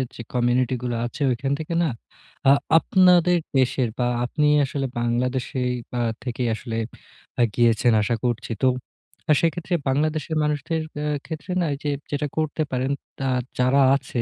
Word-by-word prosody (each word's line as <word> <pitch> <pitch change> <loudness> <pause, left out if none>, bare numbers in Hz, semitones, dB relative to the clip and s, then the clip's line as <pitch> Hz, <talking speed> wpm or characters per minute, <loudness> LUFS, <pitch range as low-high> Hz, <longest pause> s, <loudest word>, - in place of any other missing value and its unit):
যে - - -7
কমিউনিটি 125 +1 +2
গুলো 120 -1 -1
আছে 120 +5 -7
ওখান 130 +3 -2
থেকে 160 +2 -4
না 165 - +1 0.6
আ - - +9 0.3
আপনাদের 180 0 +4 0.2
দেশের 130 -1 +1
বা 120 - +2 0.2
আপনি 150 +4 +1 0.2
আসলে 135 0 -3
বাংলাদেশেই 125 +1 -1 0.3
আ - - +1 0.2
থেকেই 125 -1 -2
আসলে 115 0 -6 0.8
গিয়েছেন 120 0 +3
আশা 115 +3 0
করছি। 120 -1 -2
তো - - +6 0.7
সেক্ষেত্রে 170 +2 0
বাংলাদেশের 155 +3 0
মানুষদের 150 +2 -1 0.2
অ্যা 150 - -2 0.2
ক্ষেত্রে 160 +3 -6
না 170 - +1 0.2
যে 145 - 0 0.2
যেটা 145 0 -1
করতে 155 0 0
পারেন 130 +1 -1 0.3
তা 135 - -1 0.3
যারা 130 +2 +4
আছে 130 -3 -3
130 Hz, 145 wpm, -23 LUFS, 125-155 Hz, 0.8 s, আ